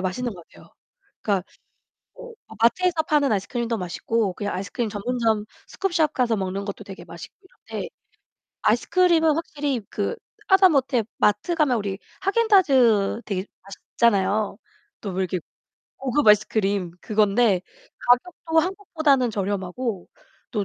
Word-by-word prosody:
맛있는 215 +5 -2
것 175 -2 -13
같아요. - - -18 0.5
그러니까 195 -3 0 0.7
뭐 485 -1 -11 0.3
마트에서 335 +7 +3
파는 295 -4 +2
아이스크림도 230 +3 -1
맛있고 200 +2 -1
그냥 205 +1 -4
아이스크림 200 +4 -3
전문점 220 0 -1 0.2
scoop 390 -3 -3
shop 310 -3 +2
가서 240 -3 +1
먹는 195 0 -3
것도 200 -1 -6
되게 195 -1 -10
맛있고 - - -11 0.4
이런데 - - -4 0.7
아이스크림은 335 -4 +3
확실히 290 -5 -2
그 205 - -2 0.3
하다못해 295 - +4
마트 210 +12 +2
가면 300 -7 +2
우리 200 -2 -4 0.2
하겐다즈 285 - +3
되게 195 -2 -3 0.2
맛있잖아요. 200 0 0 0.4
또 200 - -5
왜 185 +1 -3
이렇게 185 0 -3 0.6
고급 270 +1 0
아이스크림 205 -3 +3
그건데 210 -1 +2 0.4
가격도 320 +6 +1
한국보다는 315 - +1
저렴하고 200 +1 -3 0.4
또 210 -3 -1
230 Hz, 345 characters per minute, -24 LUFS, 200-300 Hz, 0.7 s, 하다못해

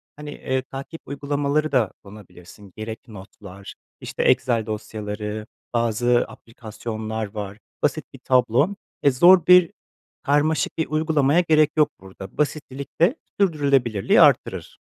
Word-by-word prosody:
hani, 150 0 -9
eee, 130 -2 -2
takip 135 +5 -9
uygulamaları 145 +2 -1
da 125 -7 +2
kullanabilirsin. 100 -1 -15
Gerek 110 +2 -7
notlar, 100 -2 -12 0.3
işte, - - -4
Excel 115 -3 +2
dosyaları, 105 0 -5 0.3
bazı 120 +1 +1
aplikasyonlar 110 -1 -6
var, 100 -1 -6 0.3
basit - - 0
bir - - -12
tablo. 125 - +3 0.3
E, 140 - +5
zor 175 +6 +6
bir, 180 -2 +7 0.5
karmaşık 150 +2 +1
bir 160 - -1
uygulamaya 155 -1 +2
gerek 155 -3 +3
yok 150 -1 +4
burada. 95 0 -12
Basitlilik 140 -2 -4
de 180 - +4 0.2
sürdürülebilirliği 140 - +2
arttırır. - - +2
125 Hz, 120 wpm, -22 LUFS, 110-150 Hz, 0.5 s, bir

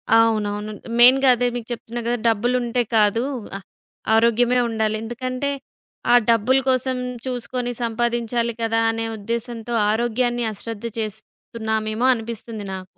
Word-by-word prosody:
అవునవును. 215 -2 +2 0.3
మెయిన్‌గా 260 +2 +7
అదే 245 +1 +1
మీకు 235 -2 -5
చెప్తున్నా 235 0 -5
గదా! 240 0 +1
డబ్బులుంటే 240 +2 +1 0.2
కాదు 215 +3 +3 0.3
ఆహ్ 195 - -14 0.5
ఆరోగ్యమే 235 +2 +3
ఉండాలి. 220 -1 0
ఎందుకంటే 255 +4 -3 0.6
ఆ - - +8
డబ్బుల 230 +4 +4
కోసం 255 0 +1 0.3
చూసుకొని 250 -1 -3
సంపాదించాలి 235 0 -1
కదా! 225 0 +1
అనే 225 0 -3
ఉద్దేశంతో 235 +2 -4 0.2
ఆరోగ్యాన్ని 240 +1 0
అశ్రద్ధ 225 +2 -7
చేస్తున్నామేమో 220 +2 -3
అనిపిస్తుంది 225 -2 -6
నాకు. 185 -1 -11
235 Hz, 115 wpm, -22 LUFS, 220-245 Hz, 0.6 s, ఆ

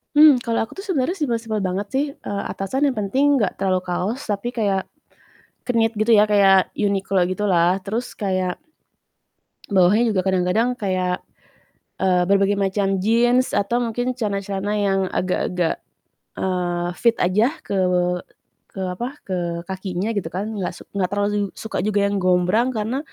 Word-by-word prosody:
Mmm, 295 -3 +8
kalo 230 -2 -1
aku 225 - -9
tuh 390 - -7
sebenernya 350 0 0
simpel-simpel 230 -6 -1
banget 195 +1 -2
sih, 275 +2 +2
eee, 200 0 -5
atasan 265 +9 -1
yang 270 - -1
penting 265 +8 +2
gak 200 - -1
terlalu 190 -1 +1
kaos 185 +8 -2
tapi 205 +4 -2
kayak, 200 -4 0 0.8
knit 230 -2 +1
gitu 215 +2 +1
ya 210 -1 +6
kayak 195 -2 +5
Uniqlo 195 -2 +1
gitu 185 +4 -1
lah 180 0 +3
terus 220 +6 -4
kayak, 185 -3 -1 1.1
bawahnya 200 +5 +4
juga 190 -3 +1
kadang-kadang 190 +7 +1
kayak, 185 -5 -1 0.8
eee, 180 -1 +2
berbagai 200 0 +3
macam 195 -1 0
jeans 240 +4 +3
atau 235 +5 0
mungkin 245 +2 -2
celana-celana 200 -3 -2
yang 195 -1 +1
agak-agak, 180 -1 -1 0.6
eee, 175 -2 -1
fit 230 +5 +2
aja 195 +6 +3 0.2
ke - - -4 1.0
ke 190 - -4
apa, 210 +7 -4 0.2
ke 170 -2 -3
kakinya 190 +2 -3
gitu 200 -6 -2
kan, 200 +5 -3
gak 180 -1 -3
suk - - -14
gak 185 -2 0
terlalu 205 0 0
suka 220 - -4
juga 205 -1 +1
yang 200 0 -1
gombrang 185 +6 +2
karena 220 +5 -1
200 Hz, 150 wpm, -22 LUFS, 185-230 Hz, 1.1 s, Mmm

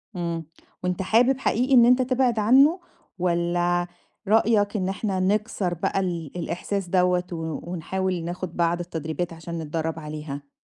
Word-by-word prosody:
إمم، 170 -2 -3 0.4
وأنت 180 0 -1
حابب 240 +7 +3
حقيقي 255 +2 +1
إن 240 -2 +8
أنت 250 +2 +5
تبعد 255 -3 +1
عنه؟ 275 - +5 0.4
والَّا 175 0 +1 0.4
رأيك 215 -1 +3
إن 185 -1 -1
إحنا 195 -1 -2
نكسر 200 -1 0
بقى 175 +3 -1
ال 170 -6 -3
الإحساس 180 +3 -3
دوَّة 180 -1 +3
ون 160 -2 -4
ونحاول 180 +1 -2
ناخد 175 0 -5
بعض 170 0 +1
التدريبات 165 0 -4
عشان 165 0 -6
نتدرّب 160 +1 -3
عليها؟ 150 -2 -7
180 Hz, 140 wpm, -24 LUFS, 170-210 Hz, 0.4 s, إن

